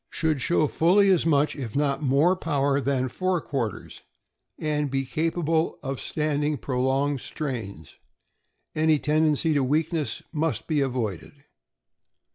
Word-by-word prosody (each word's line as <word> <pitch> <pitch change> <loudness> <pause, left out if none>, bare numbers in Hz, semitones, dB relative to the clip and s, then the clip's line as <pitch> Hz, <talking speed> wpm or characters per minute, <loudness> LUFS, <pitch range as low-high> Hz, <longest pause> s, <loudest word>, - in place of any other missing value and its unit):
— - - -55
Should 155 -4 -1
show 160 +2 +2
fully 190 +7 +4
as 170 -3 +2
much, 150 -1 +2
if 125 -7 -6
not 145 0 0
more, 145 +6 +3
power 140 -5 0
than 130 -1 0
fore 185 +7 -1
quarters, 125 - -4 0.6
and 150 -1 -1
be 135 0 -1
capable 160 +2 0
of 135 -1 -4
standing 150 -1 -1
prolonged 135 +2 0
strains. 110 - -6 0.8
Any 155 0 +3
tendency 155 +2 +2
to 145 -2 +2
weakness 155 +3 -1
must 150 -7 -1
be 150 -2 0
avoided. 120 - -3
145 Hz, 130 wpm, -25 LUFS, 135-160 Hz, 0.8 s, fully